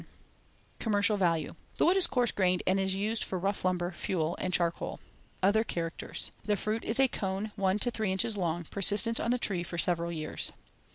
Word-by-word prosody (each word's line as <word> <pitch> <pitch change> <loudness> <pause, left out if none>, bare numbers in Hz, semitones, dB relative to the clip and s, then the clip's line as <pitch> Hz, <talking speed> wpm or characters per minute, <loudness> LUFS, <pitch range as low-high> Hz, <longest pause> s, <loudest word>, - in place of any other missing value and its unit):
The - - -16
Pitch - - -28
Pine.] - - -33
Commercial 205 -1 +2
value: 165 -5 +1 0.2
The - - +3
wood 350 +3 +5
is 380 -3 +3
coarse 245 -2 +1
grained 185 -2 +1
and 190 +1 +2
is 190 0 0
used 215 +3 0
for 190 - -3
rough 195 +3 -2
lumber, 180 -1 0
fuel, 170 -2 -2
and 185 - -1
charcoal. 170 -2 -1 0.4
Other 210 +3 +4
characters: 170 -6 -4
The 210 0 +1
fruit 215 +3 -2
is 225 - -2
a 270 - +6
cone 195 -1 -3
one 195 -1 +1
to 245 +3 0
three 215 -4 -1
inches 195 +4 0
long, 175 -3 -1
persistent 205 +6 +3
on - - -1
the 250 - +3
tree 195 -7 0
for 175 0 -6
several 170 0 +2
years. 155 -2 -2
195 Hz, 210 wpm, -30 LUFS, 175-215 Hz, 0.4 s, a